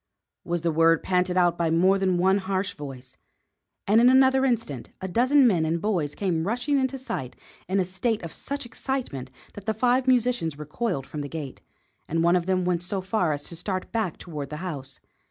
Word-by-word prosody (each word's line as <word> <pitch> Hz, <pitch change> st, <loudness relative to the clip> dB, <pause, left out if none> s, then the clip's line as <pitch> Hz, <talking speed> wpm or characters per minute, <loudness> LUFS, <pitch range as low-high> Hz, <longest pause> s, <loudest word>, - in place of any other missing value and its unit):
was 175 Hz, -1 st, -2 dB
the 170 Hz, 0 st, +1 dB
word 165 Hz, +1 st, +4 dB
panted 180 Hz, 0 st, +1 dB
out 175 Hz, -1 st, +3 dB
by 170 Hz, -1 st, +2 dB
more 185 Hz, +4 st, +4 dB
than 185 Hz, -2 st, +2 dB
one 190 Hz, +3 st, +3 dB
harsh 190 Hz, 0 st, -2 dB
voice; 135 Hz, -3 st, -9 dB, 0.7 s
and 215 Hz, +3 st, +5 dB
in 245 Hz, -, +7 dB
another 265 Hz, 0 st, +5 dB
instant 230 Hz, -, -2 dB
a 190 Hz, -, -4 dB
dozen 255 Hz, +8 st, +4 dB
men 185 Hz, -9 st, +3 dB
and 160 Hz, +2 st, 0 dB
boys 170 Hz, -7 st, -1 dB
came 175 Hz, -5 st, 0 dB
rushing 245 Hz, +6 st, +1 dB
into 265 Hz, 0 st, -1 dB
sight 135 Hz, -, -5 dB, 0.3 s
in 190 Hz, +2 st, +1 dB
a 185 Hz, -, +2 dB
state 200 Hz, +4 st, -1 dB
of 165 Hz, -, -6 dB
such 280 Hz, -2 st, -4 dB
excitement 235 Hz, -, -4 dB, 0.2 s
that 205 Hz, 0 st, -11 dB
the 220 Hz, -, +1 dB
five 250 Hz, +3 st, +2 dB
musicians 245 Hz, -, +2 dB
recoiled 150 Hz, -, -3 dB
from 150 Hz, -, -6 dB
the 145 Hz, -, -5 dB
gate, 150 Hz, -4 st, -6 dB, 0.5 s
and 165 Hz, +1 st, 0 dB
one 170 Hz, +1 st, +4 dB
of 180 Hz, 0 st, 0 dB
them 185 Hz, -1 st, +1 dB
went 175 Hz, -1 st, +1 dB
so 185 Hz, +2 st, -2 dB
far 185 Hz, -3 st, 0 dB
as 145 Hz, -1 st, -3 dB
to 170 Hz, -, -8 dB
start 185 Hz, +2 st, -4 dB
back 220 Hz, -7 st, -1 dB
toward 150 Hz, -5 st, -6 dB
the 150 Hz, -, -5 dB
house. 140 Hz, -6 st, -5 dB
185 Hz, 205 wpm, -26 LUFS, 160-230 Hz, 0.7 s, in